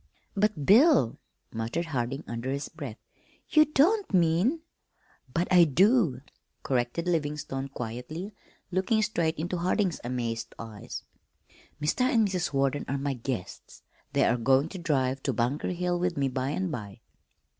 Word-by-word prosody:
"But, 200 -7 +1
Bill," 245 - +5 0.3
muttered 115 +10 -2
Harding 135 -2 -3
under 120 +2 -4
his 140 +2 -3
breath, 140 -9 -7 0.5
"you 310 -1 +6
don't 350 +9 +2
mean 185 - +2 0.3
" 130 - -32
"But 170 +6 0
I 175 -1 +8
do," 170 - +3 0.4
corrected 125 +5 -1
Livingstone 150 -5 -2
quietly, 130 - -6 0.4
looking 190 +4 +2
straight 170 -7 0
into 175 +4 -2
Harding's 185 0 0
amazed 115 -2 -3
eyes. 110 -3 -8 0.8
"Mr. 150 - 0
and 235 -4 +3
Mrs. 180 -3 -2
Warden 140 0 0
are 140 - -1
my 140 0 -1
guests. 125 -6 -6 0.3
They - - +3
are 125 - +2
going 135 +6 +3
to 190 - -7
drive 135 -5 0
to 135 - -1
Bunker 120 +6 -1
Hill 180 0 -1
with 180 -2 -1
me 140 -1 +1
by 130 +1 -2
and 185 +4 -2
by." 105 -7 -7
150 Hz, 145 wpm, -28 LUFS, 130-180 Hz, 0.8 s, I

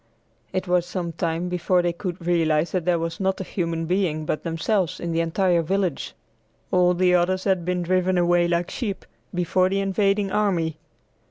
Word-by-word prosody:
It 185 0 -2
was 175 -1 +2
some 175 -3 -3
time 165 +1 -2
before 180 0 +1
they 175 -1 0
could 175 -1 -6
realize 165 -2 +2
that 180 -3 -1
there 180 -1 +3
was 165 0 -4
not 190 -1 0
a - - -2
human 165 -3 -2
being 170 -3 0
but 155 - -2
themselves 180 +2 -1
in 170 - -3
the 165 - 0
entire 170 +1 +2
village; 185 -1 -2 0.6
all 180 -1 +4
the 180 0 +3
others 185 +1 +2
had 190 -4 +1
been 180 0 -1
driven 185 +1 +1
away 175 0 +3
like 170 0 -1
sheep, 205 -6 -4 0.3
before 180 +1 +1
the 195 +1 0
invading 195 0 +1
army. 170 -7 0
180 Hz, 180 wpm, -24 LUFS, 170-185 Hz, 0.6 s, all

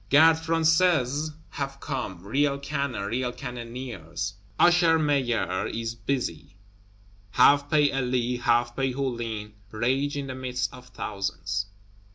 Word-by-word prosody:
Gardes 160 +3 +6
Françaises 160 -3 +2 0.2
have 140 -1 -4
come; 115 - -5
real 140 +6 +1
cannon, 140 -5 -3
real 120 +4 -1
cannoneers. 120 - -6 0.2
Usher 175 -2 +5
Maillard 130 -12 0
is 115 0 -3
busy; 115 - -3 0.7
half 140 +6 +5
pay 150 -2 +4
Elie, 125 -2 0
half 120 0 +2
pay 135 -1 0
Hulin, 115 -5 -3 0.2
rage 130 +6 0
in 140 - -3
the 130 - -5
midst 125 -1 -3
of 125 0 -12
thousands. 100 -4 -3
130 Hz, 120 wpm, -26 LUFS, 115-140 Hz, 0.7 s, Gardes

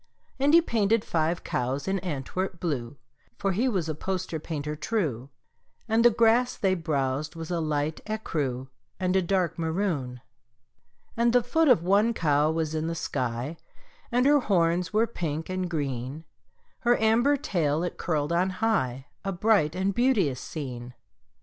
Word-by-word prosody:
And 285 +4 +4
he 335 - +7
painted 225 -4 +1
five 165 +1 0
cows 130 +5 -2
in 195 0 0
Antwerp 175 +2 -4
blue 140 -6 -3 0.4
(For 195 - 0
he 230 +8 +1
was 185 -8 -1
a 155 - -1
poster 185 0 -3
painter 150 -1 -4
true), 150 - -2 0.6
And 225 +1 +3
the 240 - +8
grass 235 +2 +3
they 190 -2 +2
browsed 150 -3 -1
was 165 +1 -6
a 175 - 0
light 155 -1 -1
écru 145 - -2 0.3
And 185 0 0
a 190 - +4
dark 180 -2 0
maroon. 160 -8 -2 0.9
And 235 0 +2
the 245 -1 +4
foot 320 +7 +2
of 240 - +5
one 205 +5 +3
cow 150 -3 +2
was 160 -1 -1
in 160 0 -1
the 165 - -2
sky, 125 +1 -3 0.5
And 245 +2 +2
her 290 +1 +6
horns 180 -5 +1
were 215 +2 +3
pink 165 -8 -4
and 185 -1 -2
green; 140 -1 -3 0.5
Her 240 0 +3
amber 235 +6 +3
tail 165 - 0
it 180 - -4
curled 155 -1 -1
on 180 +2 +2
high 185 - -1 0.2
A 195 - -2
bright 180 -4 +2
and 190 +2 0
beauteous 200 - +2
scene. 125 -5 -7
175 Hz, 160 wpm, -27 LUFS, 150-215 Hz, 0.9 s, the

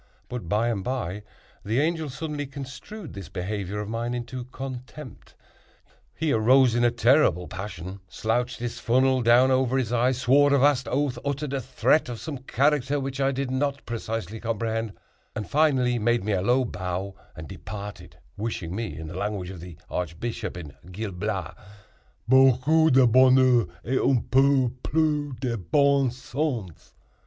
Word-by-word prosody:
But, 120 -9 -6
by 110 +4 +1
and 100 -5 -2
by, 105 -5 -3 0.4
the 110 +5 0
Angel 160 0 0
suddenly 145 +1 -4
construed 140 +8 -9
this 95 -5 -8
behavior 100 +2 -4
of 105 - -6
mine 115 +2 -3
into 125 +1 -5
contempt. 130 +1 -9 0.8
He 160 -1 0
arose 125 +3 +5
in 120 0 +1
a 120 - +5
terrible 120 - +3
passion, 95 -1 -7
slouched 120 +3 -1
his 120 -1 -5
funnel 130 +2 +2
down 120 +3 +5
over 130 0 +2
his 125 -3 -1
eyes, 125 +1 +2
swore 140 +3 +4
a - - +4
vast 135 -2 +3
oath, 140 -1 -1
uttered 140 0 -3
a 135 - -1
threat 130 +3 +1
of 120 -2 -5
some 150 -5 -6
character 140 +2 +1
which 135 0 -4
I 135 0 +2
did 135 -1 -3
not 140 +1 -1
precisely 110 -3 -4
comprehend, 115 -1 -2 0.4
and 105 - -4
finally 130 -5 +2
made 120 0 +1
me 105 - -1
a 95 -2 +1
low 125 +6 +2
bow 95 -1 -4 0.2
and 80 0 -8
departed, 105 +4 -8 0.2
wishing 100 -5 -4
me, 110 -3 -4
in 80 - -7
the 80 - -7
language 100 -3 -3
of 95 - -9
the 90 -2 -10
archbishop 90 +4 -4
in 75 -5 -8 0.2
Gil 105 +2 -4
Blas, 95 -2 -3 0.7
"beaucoup 135 +5 +5
de 130 0 +6
bonheur 130 -2 +5 0.2
et 130 +4 +1
un 135 -3 +3
peu 135 -1 +4
plus 150 -3 0
de 125 -3 -1
bon 140 - +3
sens." 125 - -4
125 Hz, 160 wpm, -25 LUFS, 105-135 Hz, 0.8 s, de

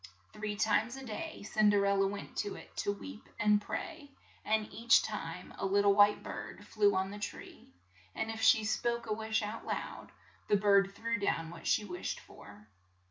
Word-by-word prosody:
Three 210 0 -4
times 220 +4 +1
a 270 0 -8
day 285 +5 -6
Cin 215 0 +3
der 200 -1 +3
el 200 0 +2
la 195 - +3
went 200 +1 -6
to 205 - -2
it - - -13
to 205 - 0
weep 100 - -9
and 210 0 +3
pray, 310 - -6 0.3
and 215 0 +1
each 235 +1 +5
time 180 -4 -6
a - - -1
lit 200 +1 +3
tle 200 0 +5
white 205 +1 +5
bird 205 - -7
flew 205 -1 +2
on 190 +1 0
the 205 - -7
tree; 205 - -8 0.5
and 220 - -2
if 225 0 -6
she 220 -1 +6
spoke 235 +2 -1
a 220 - -1
wish 220 0 -1
out 210 +2 -5
lou - - -1
1, - - -7 0.4
the 205 - +4
bird 200 -1 +4
threw 230 0 -2
down 165 -5 -1
what 170 - -8
she 210 - +2
wished 180 -3 -4
for. 100 +1 -15
210 Hz, 200 wpm, -32 LUFS, 200-220 Hz, 0.5 s, she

